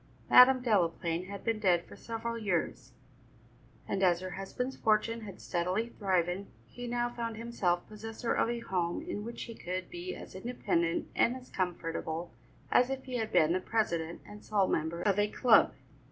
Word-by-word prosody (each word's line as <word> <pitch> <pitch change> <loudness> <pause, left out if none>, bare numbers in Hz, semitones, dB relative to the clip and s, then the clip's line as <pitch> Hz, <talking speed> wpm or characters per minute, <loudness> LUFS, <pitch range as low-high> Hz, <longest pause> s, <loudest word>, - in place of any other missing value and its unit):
Madam 255 0 +8
Delaplaine 175 -5 +1
had 200 -1 -7
been 225 -1 0
dead 180 -4 +3
for - - -12
several 230 0 -4
years, 175 - -2 0.9
and 195 - -1
as 175 -2 +4
her 185 0 -6
husband's 250 +8 -4
fortune 225 +1 +1
had 200 -4 -9
steadily 185 +6 -1
thriven, 185 -2 0 0.2
he 245 - -8
now 240 0 0
found 230 -2 -4
himself 200 -7 -1
possessor 225 +2 -4
of - - +2
a 235 0 -2
home 180 - -1
in 330 -12 -4
which 235 +2 -6
he 230 - -7
could 185 -3 -5
be 355 +1 -5
as - - -10
independent 185 -6 -1
and 240 - +3
as 255 -1 -11
comfortable 170 -3 -3 0.4
as 250 +1 +5
if 270 0 -3
he 255 -2 -4
had 220 -1 -2
been 160 +1 +4
the 185 - +1
president 170 -6 -1
and 210 0 -11
sole 200 -3 +2
member 165 +2 -1
of 200 -1 +2
a 205 - +3
club. 235 +1 +5
205 Hz, 175 wpm, -31 LUFS, 175-235 Hz, 0.9 s, Madam